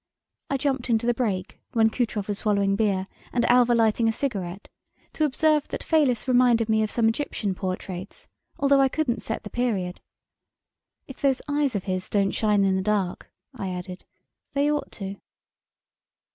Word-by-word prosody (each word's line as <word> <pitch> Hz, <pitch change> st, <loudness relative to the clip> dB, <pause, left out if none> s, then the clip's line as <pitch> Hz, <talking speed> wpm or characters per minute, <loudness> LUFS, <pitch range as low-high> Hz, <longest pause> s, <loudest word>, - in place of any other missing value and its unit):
I 275 Hz, -, +1 dB
jumped 265 Hz, -2 st, -1 dB
into 230 Hz, 0 st, +2 dB
the 240 Hz, -, +3 dB
break 205 Hz, -6 st, -2 dB
when 225 Hz, -2 st, +4 dB
Kutrov 220 Hz, -5 st, -2 dB
was 205 Hz, -1 st, -2 dB
swallowing 200 Hz, -2 st, +1 dB
beer 200 Hz, -3 st, +1 dB, 0.3 s
and 240 Hz, -, +1 dB
Alva 245 Hz, -1 st, +5 dB
lighting 225 Hz, 0 st, +3 dB
a -, -, +3 dB
cigaret 200 Hz, -7 st, -4 dB, 0.5 s
to 310 Hz, -, +1 dB
observe 300 Hz, +1 st, +2 dB
that -, -, -5 dB
Fayliss 270 Hz, -8 st, +2 dB
reminded 245 Hz, -3 st, +4 dB
me 220 Hz, 0 st, +3 dB
of 215 Hz, -, 0 dB
some 230 Hz, 0 st, +2 dB
Egyptian 225 Hz, -4 st, -1 dB
portraits 185 Hz, 0 st, -6 dB, 0.3 s
although 280 Hz, -1 st, +4 dB
I 270 Hz, -, +4 dB
couldn't 255 Hz, -6 st, -1 dB
set 225 Hz, -, -4 dB
the 210 Hz, -, -8 dB
period. 200 Hz, -8 st, -1 dB, 1.1 s
"If 270 Hz, -, -11 dB
those 275 Hz, -2 st, +2 dB
eyes 290 Hz, -4 st, 0 dB
of 195 Hz, -, -1 dB
his 185 Hz, -1 st, -3 dB
don't 200 Hz, -1 st, +2 dB
shine 210 Hz, -2 st, +2 dB
in 190 Hz, -1 st, +2 dB
the 190 Hz, -, 0 dB
dark," 195 Hz, -3 st, -1 dB, 0.2 s
I 190 Hz, -, -4 dB
added, 180 Hz, 0 st, -6 dB, 0.5 s
"they 285 Hz, +1 st, +3 dB
ought 295 Hz, -, -2 dB
to." 195 Hz, -1 st, -6 dB
225 Hz, 170 wpm, -25 LUFS, 195-255 Hz, 1.1 s, Alva